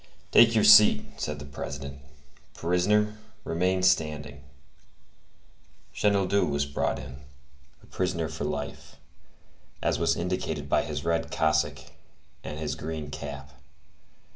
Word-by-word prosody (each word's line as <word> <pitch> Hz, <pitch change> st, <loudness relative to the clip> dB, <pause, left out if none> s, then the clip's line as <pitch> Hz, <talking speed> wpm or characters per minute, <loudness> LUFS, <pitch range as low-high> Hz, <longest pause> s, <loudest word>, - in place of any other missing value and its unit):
"Take 115 Hz, -1 st, +6 dB
your 110 Hz, -, +4 dB
seat," 105 Hz, 0 st, +7 dB, 0.2 s
said 75 Hz, 0 st, -3 dB
the 70 Hz, -, -9 dB
President. 70 Hz, 0 st, -7 dB, 0.6 s
"Prisoner, 105 Hz, +5 st, +1 dB, 0.2 s
remain 90 Hz, +2 st, 0 dB
standing." 75 Hz, -6 st, 0 dB, 1.5 s
Chenildieu 100 Hz, -1 st, +2 dB
was 70 Hz, -1 st, 0 dB
brought 70 Hz, 0 st, -1 dB
in, 65 Hz, -1 st, -9 dB, 0.7 s
a -, -, -15 dB
prisoner 90 Hz, -3 st, -2 dB
for 80 Hz, +1 st, -6 dB
life, -, -, -5 dB, 0.8 s
as -, -, 0 dB
was -, -, +1 dB
indicated -, -, -3 dB
by -, -, +2 dB
his -, -, -5 dB
red 85 Hz, -1 st, 0 dB
cassock 80 Hz, -2 st, 0 dB, 0.6 s
and 75 Hz, -, -6 dB
his 75 Hz, -2 st, -3 dB
green 75 Hz, -1 st, -6 dB
cap. 70 Hz, -2 st, -7 dB
80 Hz, 115 wpm, -27 LUFS, 70-95 Hz, 1.5 s, seat